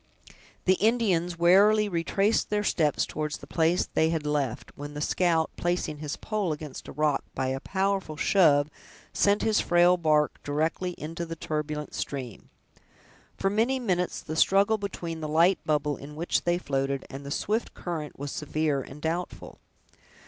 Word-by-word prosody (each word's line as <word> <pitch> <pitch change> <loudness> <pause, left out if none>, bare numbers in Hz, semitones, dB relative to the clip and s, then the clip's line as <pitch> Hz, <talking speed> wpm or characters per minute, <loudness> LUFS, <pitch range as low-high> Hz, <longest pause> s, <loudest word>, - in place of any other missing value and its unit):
The 185 0 +3
Indians 195 -7 +2
warily 205 +5 +5
retraced 195 +4 +1
their 210 0 0
steps 155 -7 +1
toward 150 -1 -4
the - - -7
place 165 +2 +1
they 160 - +1
had 160 -2 -2
left, 145 -5 -2
when 145 +1 -8
the - - -4
scout, 165 +1 +1
placing 175 -3 -1
his 150 -1 -4
pole 210 -6 -2
against 150 -2 -7
a - - -7
rock, 150 -1 +1
by 130 - -1
a 135 0 -2
powerful 190 -2 -1
shove, 150 -6 +4 0.4
sent 200 +1 +2
his 220 -1 +3
frail 175 +1 +4
bark 155 -3 +1
directly 160 +5 -1
into 165 +3 -5
the 165 0 -5
turbulent 150 -1 -4
stream. 130 -7 -5 0.9
For 195 - 0
many 230 +6 +2
minutes 180 -7 -1
the 155 - -6
struggle 200 +6 +4
between 170 -5 -5
the 155 - -3
light 170 +5 +4
bubble 150 -2 +1
in 150 +1 -10
which 165 +3 -1
they 175 0 +2
floated 135 -4 -2
and 135 +1 -7
the 140 - -7
swift 210 +9 -2
current 160 -4 -5
was 145 0 -5
severe 150 -1 -1
and 140 +3 -11
doubtful. 170 +3 -4
165 Hz, 165 wpm, -27 LUFS, 150-185 Hz, 0.9 s, warily